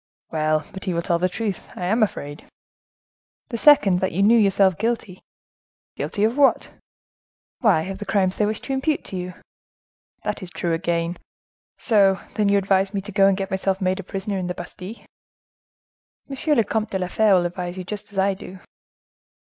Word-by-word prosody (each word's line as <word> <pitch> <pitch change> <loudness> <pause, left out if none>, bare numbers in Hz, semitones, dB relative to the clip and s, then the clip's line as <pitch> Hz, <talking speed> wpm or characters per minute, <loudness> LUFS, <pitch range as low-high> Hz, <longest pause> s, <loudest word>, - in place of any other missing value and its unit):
"Well! 155 -1 0
but 190 0 -8
he 185 -3 -1
will 170 - -1
tell 170 0 +1
the 185 +1 +1
truth,—I 195 -3 -4
am 220 +6 +1
afraid." 145 -8 -2 1.0
"The 235 - -3
second, 210 -12 +6
that 190 0 0
you 195 +4 +1
knew 220 +3 +6
yourself 195 -4 +3
guilty." 220 -4 -2 0.7
"Guilty 205 - -2
of 225 +5 +1
what?" 280 - +3 0.9
"Why, 200 -10 +3
of 195 +2 -6
the 205 - -5
crimes 190 -2 +1
they 210 - +2
wish 215 0 -2
to 270 - -4
impute 280 +3 0
to - - -7
you." 180 0 -5 0.9
"That 210 0 -3
is 185 - -7
true 175 -1 -2
again. 170 0 -1 0.6
So, 195 -5 +3
then, 210 -2 +1
you 200 - +4
advise 195 0 +1
me 195 - 0
to 205 +2 -9
go 195 0 +4
and 195 -1 +2
get 195 -1 -4
myself 190 0 0
made 185 0 0
a - - -5
prisoner 195 +2 -4
in 180 - -3
the 180 - -3
Bastile?" 185 +5 -9 1.2
"M. 285 +2 0
le 230 - +4
Comte 220 +1 -2
de 190 - -1
la 185 -1 -2
Fere 210 +2 +3
would 175 -1 +2
advise 175 +1 -4
you 185 - -4
just 205 +3 -7
as 200 - -11
I 195 +1 +3
do." 190 0 -10
195 Hz, 190 wpm, -23 LUFS, 180-210 Hz, 1.2 s, second